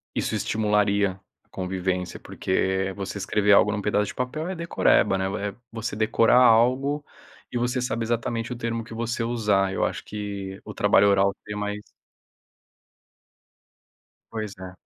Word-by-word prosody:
isso - - -1
estimularia 105 -2 +1 0.2
a - - -39
convivência, 90 -1 -3
porque 95 +1 -1
você 100 0 -5
escrever 105 +1 +1
algo 105 +1 +5
num 105 0 -2
pedaço 105 0 +1
de - - -7
papel 140 +6 -3
é 190 - -3
decoreba 165 -11 +2
né, 100 +2 -2
é 100 - -11 0.2
você 115 -1 -4
decorar 110 +2 +3
algo 130 +5 +4 0.5
e 120 - -2
você 125 +1 0
sabe 115 -2 -1
exatamente 115 +1 -2
o - - -7
termo 115 -1 -3
que 115 - -11
você 115 +1 -2
usar. 105 -5 +1
Eu - - 0
acho - - -3
que 100 -2 -6
o - - -8
trabalho 100 +1 +4
oral 100 0 +3
seria 105 0 -5
mais 105 0 -3 2.5
Pois 110 -3 -4
é. 95 -1 -8
105 Hz, 155 wpm, -25 LUFS, 100-115 Hz, 2.5 s, algo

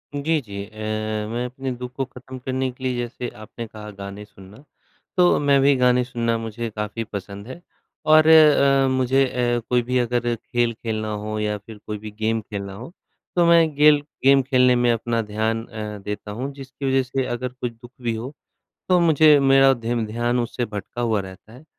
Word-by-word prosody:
जी, 155 +3 +1
जी 100 -5 -7
अ, - - -17 0.6
मैं 120 +2 -2
अपने 130 +1 -5
दुःख 125 0 -6
को 135 - -1
ख़त्म 130 0 -11
करने 130 0 -1
के 125 +1 -15
लिए 130 -1 0
जैसे 120 0 -4
आपने 110 +2 -8
कहा 105 -1 -10
गाने 100 +1 -7
सुनना, 100 +5 -16 0.5
तो 180 -1 +5
मैं 140 -1 +3
भी 140 +1 +5
गाने 125 -1 +3
सुनना 115 -2 -1
मुझे 115 +1 -5
काफ़ी 105 +1 -4
पसंद 100 -1 -8
है 150 +7 -9 0.5
और 155 0 +7
अ, 140 -4 +6
मुझे 130 +1 +2
अ, 120 -1 0
कोई 125 -1 +3
भी 125 +1 0
अगर 120 0 0
खेल 120 0 -1
खेलना 110 -1 -4
हो 110 0 -3
या 105 0 -1
फिर 105 +2 -12
कोई 105 - -3
भी 105 +1 -9
गेम 110 +1 0
खेलना 100 -2 -6
हो, 120 +10 -9 0.4
तो 175 -1 +4
मैं 165 -3 +4
गेल 150 0 +6 0.2
गेम 135 +1 +6
खेलने 125 -1 +3
में 120 0 +3
अपना 115 0 -1
ध्यान 110 +1 -2
अ, 105 -2 -6
देता 105 0 -5
हूँ। 130 +6 -4
जिसकी 135 0 -8
वजह 135 0 +2
से 130 +1 -2
अगर 125 +1 -3
कोई 125 0 -5
दुःख 120 +1 -15
भी 115 -2 -1
हो, 120 +6 -6 0.6
तो 180 -1 +4
मुझे 155 -2 +6
मेरा 135 0 +6
धेम 115 -1 -2
ध्यान 120 +3 0
उससे 120 +1 -2
भटका 105 +2 -6
हुआ 110 -3 +1
रहता 95 +3 -11
है 125 +6 -14
120 Hz, 195 wpm, -22 LUFS, 110-135 Hz, 0.6 s, और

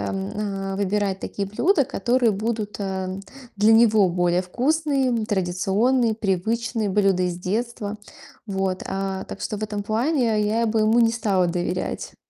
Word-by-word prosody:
м, 95 -1 -3 0.4
а, - - -3
выбирать 200 -1 -1
такие 200 -1 -4
блюда, 295 - +2
которые 240 +1 +1
будут, 215 0 -3
а, 190 -1 -3 0.4
для 210 +2 +5
него 220 -3 +5
более 175 0 +1
вкусные, 260 - 0
традиционные, 205 +5 +1
привычные 220 +2 -1 0.3
блюда 195 -2 +2
из 180 -1 -2
детства, 215 +2 -3 0.5
вот, 190 -2 -2
а. 195 0 -3
Так - - -9
что 210 - -3
в - - -7
этом 205 -1 -4
плане 230 +1 +1
я 225 +2 +1
бы 220 0 +1
ему 215 +2 +3
не 230 -1 +4
стала 200 -6 +1
доверять. 175 +1 -3
210 Hz, 145 wpm, -23 LUFS, 190-230 Hz, 0.5 s, для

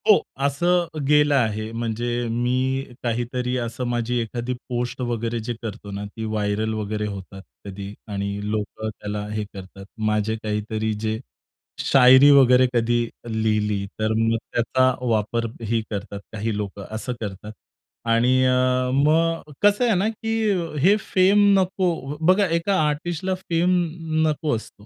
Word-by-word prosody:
हो. 210 - +7 0.2
असं 175 +5 +2 0.2
गेलं 150 0 +4
आहे. 110 -3 0
म्हणजे 115 0 -3 0.2
मी 130 +3 0 0.2
काहीतरी 125 +1 -1
असं 120 +1 -3
माझी 120 0 -1
एखादी 120 +2 -3 0.2
पोस्ट 120 +1 -3
वगैरे 120 -1 -2
जे 120 - -1
करतो 105 -2 -7
ना 100 +1 -5
ती 110 +2 -8
व्हायरल 110 0 -1
वगैरे 105 0 -3
होतात 95 -1 -8 0.2
कधी. 100 0 -7
आणि 100 -1 -3
लोकं 110 +1 -3
त्याला 105 -1 -5
हे 105 0 -2
करतात. 95 0 -10 0.2
माझे 105 +1 0
काहीतरी 110 +1 -2
जे; 110 +1 -2 0.6
शायरी 130 +1 +7
वगैरे 125 -1 +5
कधी 120 0 +2 0.3
लिहिली; 105 -2 0
तर 110 0 +1
मग 115 0 +2
त्याचा 130 +2 +2
वापरही 115 +1 -1
करतात 100 -1 -5
काही 110 +1 -2
लोकं, 100 -1 -5
असं 125 +3 -3
करतात. 105 0 -6 0.6
आणि 120 +3 +3
अ, 130 0 +2
मग 155 +3 +2
कसं 205 +4 +4
आहे 230 -4 +3
ना, 190 +4 +1
की 225 0 -4 0.5
हे 195 +7 +6 0.2
फेम 195 +2 +5 0.2
नको 185 0 +1 0.4
बघा 190 +2 +5
एका 170 +4 +1
आर्टिस्टला 175 +5 -2
फेम 180 0 +1 0.5
नको 150 -3 0
असतो. 105 -2 -9
115 Hz, 140 wpm, -23 LUFS, 110-140 Hz, 0.6 s, हो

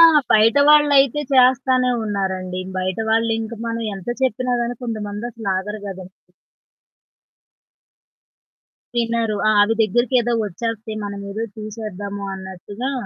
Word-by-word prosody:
ఆ! - - +10 0.3
బయటవాళ్ళైతే 285 +4 +5
చేస్తానే 255 0 +4
ఉన్నారండి. 190 -3 -2 0.2
బయట 185 +2 -2
వాళ్ళు 225 +1 +2
ఇంకా 225 0 -6
మనం 230 0 -3
ఎంత 190 +1 -10
చెప్పినా 255 0 0
గాని 240 0 -3
కొంతమంది 215 -1 -4
అసలు 220 -3 -4
ఆగరు 210 +3 -5
గదండి. 185 -1 -9 2.8
తినరు. 230 -2 0
ఆ! - - +5
అవి 225 +2 +2
దగ్గరికేదో 240 +3 +1
వచ్చేస్తాయి. 220 +2 -4
మనమేదో 200 +2 -5
తీసేద్దాము 205 -2 -6
అన్నట్టుగా 190 +6 -6
220 Hz, 105 wpm, -21 LUFS, 200-240 Hz, 2.8 s, ఆ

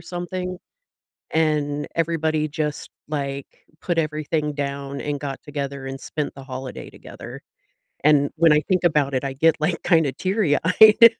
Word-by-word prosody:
something, 180 +1 -5 0.7
and 150 -2 +1
everybody 160 -2 0
just, 150 0 -3 0.2
like, 140 -2 -5 0.2
put 175 -2 -1
everything 155 -1 -1
down 140 -1 -4
and 145 -1 -3
got 140 -2 -5
together 140 -2 -5
and 135 0 -6
spent 150 +2 -4
the 135 - -10
holiday 130 -1 -7
together, - - -10 0.6
and 145 -1 +4
when 165 -1 +5
I 150 - +5
think 185 -2 +2
about 150 -5 +2
it, 130 - 0
I 135 - -2
get, 155 +3 +3
like, 165 +2 0
kinda 160 -6 +3
teary-eyed. 205 - +5
150 Hz, 145 wpm, -23 LUFS, 140-165 Hz, 0.7 s, when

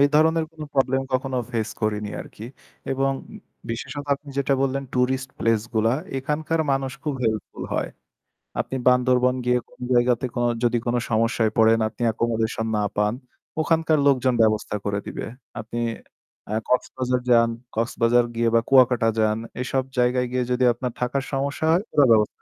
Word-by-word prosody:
এই 140 - +7
ধরনের 160 +1 +4
কোন 160 - -16
প্রবলেম 135 -1 +2
কখনো 130 0 -1
ফেস 110 -3 -1
করিনি 105 -1 -1
আরকি। 110 - -10 0.5
এবং 135 +1 +1 0.6
বিশেষত 145 +5 -5
আপনি 145 +1 -14
যেটা 140 0 +2
বললেন 135 0 0
টুরিস্ট 130 +1 0
প্লেস 115 -1 +2
গুলা 110 +1 +3 0.3
এখানকার 150 +4 -1
মানুষ 135 -1 -1
খুব 150 -3 -2
হেল্পফুল 110 -1 -2
হয়। - - -1 0.7
আপনি 135 - -3
বান্দরবন 125 0 +3
গিয়ে 125 0 +3
কোন - - -23
জায়গাতে 125 +1 +3
কোন 120 - 0 0.2
যদি 120 0 +2
কোন 120 - +1 0.2
সমস্যায় 115 0 +2
পড়েন 115 0 +5
আপনি 110 +2 -9
একোমোডেশন 115 0 -1
না 105 - +1
পান, 105 +1 +2 0.5
ওখানকার 160 -1 +2
লোকজন 130 -2 +3
ব্যবস্থা 110 -1 +1
করে 100 0 -1
দিবে। - - -5 0.3
আপনি 115 +2 -6 0.8
এ - - +1
কক্সবাজার 125 0 0
যান, 115 -1 +6 0.3
কক্সবাজার 115 +1 +2
গিয়ে 115 0 +1
বা 115 - +6
কুয়াকাটা 125 -3 +5
যান 110 0 +2 0.2
এসব 130 +1 0 0.2
জায়গায় 125 +1 +2
গিয়ে 125 0 0
যদি 125 +1 +2
আপনার 120 +1 -4
থাকার 125 +2 0
সমস্যা 140 +3 -1
হয় 175 +3 +3
ওরা 145 -3 +6
ব্যবস্থা 105 -1 +5
125 Hz, 160 wpm, -23 LUFS, 115-135 Hz, 0.8 s, এই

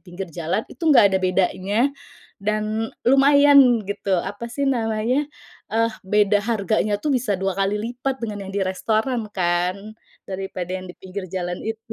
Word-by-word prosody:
pinggir 180 +1 -7
jalan, 170 +7 -2
itu - - -19
nggak 205 -10 +6
ada 190 - +3
bedanya 190 +7 +1 0.5
dan 215 +2 -1 0.2
lumayan 275 -2 +6
gitu, 200 -1 -1
apa 205 +6 -4
sih 280 +4 -2
namanya, 240 +2 0 0.4
eh, 230 +1 +2
beda 205 +1 +2
harganya 215 -1 0
tuh 285 +8 -1
bisa 235 -6 0
2 195 +1 -1
kali 195 +2 0
lipat 245 +5 -3
dengan 205 -4 -5
yang - - -7
di - - +1
restoran 220 +5 -1
kan, 180 -1 0 0.5
daripada 185 -2 -5
yang 185 0 -5
di 180 - -11
pinggir 190 0 -7
jalan 175 -1 -4
itu, 225 0 -6
210 Hz, 155 wpm, -22 LUFS, 190-235 Hz, 0.5 s, nggak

